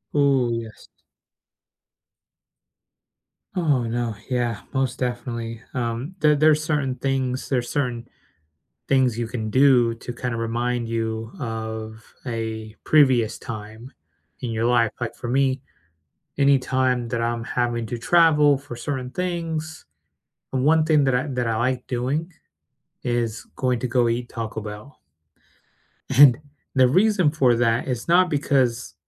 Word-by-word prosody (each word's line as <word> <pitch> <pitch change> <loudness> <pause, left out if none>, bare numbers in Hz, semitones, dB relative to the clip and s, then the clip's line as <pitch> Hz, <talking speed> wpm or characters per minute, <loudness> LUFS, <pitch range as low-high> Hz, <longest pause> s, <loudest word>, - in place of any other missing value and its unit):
Ooh, 135 -4 +3
yes. 115 -2 -7 2.7
Oh, 150 -9 +1
no. 115 -1 -2
Yeah, 120 -4 -1
most 135 -1 -1
definitely. 120 -2 -4
Um, 125 +6 -3
there 150 -1 +4
there's 155 +1 +4
certain 145 -4 -1
things 130 -1 -2
there's 125 -3 0
certain 125 -4 -2 0.8
things 130 -4 +2
you 120 -1 -2
can 110 -2 -4
do 125 -1 +4
to 120 +1 -7
kinda 120 -1 -3
remind 120 +1 -1
you 115 0 -3
of 110 -2 -5 0.2
a 110 -2 -4
previous 130 -7 +4
time 110 +3 -8 0.5
in 120 -3 -3
your 115 0 -1
life, 120 -2 +3
like, 120 -2 -4
for 120 - -7
me, 130 +1 +1 0.8
any 140 -1 +4
time 130 -2 0
that 115 -1 -2
I'm 115 0 -1
having 120 -1 -1
to 120 - -4
travel 150 +1 +4
for 135 -2 -9
certain 130 +1 -4
things, 165 -3 -4 0.7
the - - -1
one 155 +4 +4
thing 155 -2 +4
that 130 -2 +2
I 125 - 0
that 125 -3 -2
I 115 -1 0
like 125 +2 -1
doing 135 +8 -2 0.7
is 120 -1 -2
going 125 -2 0
to 125 - -2
go 120 0 +2
eat 120 +1 -2
Taco 110 -1 -5
Bell. 105 +6 -9 1.2
And 135 -4 +8 0.4
the 130 -1 +6
reason 185 - +3
for 130 -6 +3
that 115 0 +1
is 125 -3 -3
not 180 +2 +4
because 130 -5 0
125 Hz, 135 wpm, -23 LUFS, 115-140 Hz, 2.7 s, And